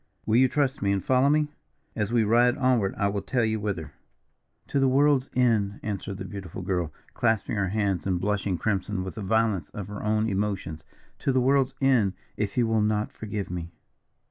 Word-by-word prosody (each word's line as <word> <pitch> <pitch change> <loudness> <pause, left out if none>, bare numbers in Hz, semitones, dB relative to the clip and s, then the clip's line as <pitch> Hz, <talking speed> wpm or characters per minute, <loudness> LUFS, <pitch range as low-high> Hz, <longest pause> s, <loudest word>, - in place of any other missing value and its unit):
Will 110 +1 +3
you 130 +1 +6
trust 140 0 0
me 100 0 +2
and 100 -1 0
follow 130 +2 +4
me? 150 0 +2 0.5
As 105 0 -1
we 120 -2 +3
ride 120 +4 +4
onward 125 -7 +2
I 100 - +2
will 100 0 -1
tell 120 +1 0
you 110 0 0
whither." 95 -7 -4 0.8
"To 140 - +1
the 135 - +4
world's 140 0 +3
end," 110 -5 +2
answered 100 -2 -4
the - - -6
beautiful 95 -3 -7
girl, 90 -4 -1 0.2
clasping 110 -2 0
her 100 -2 0
hands 100 -3 -1
and 90 -2 +1
blushing 100 -1 -1
crimson 100 +1 -1
with 95 - -5
the 110 - -7
violence 105 -5 +1
of 100 -3 -5
her 105 - -6
own 110 +1 +1
emotions. 95 -6 -2 0.4
"To 135 - 0
the 130 - +2
world's 135 +1 +2
end, 125 -8 +3 0.2
if 105 0 -3
you 120 - +4
will 110 -1 +2
not 105 0 0
forgive 105 -3 -5
me." 85 -2 -4
105 Hz, 195 wpm, -26 LUFS, 100-125 Hz, 0.8 s, you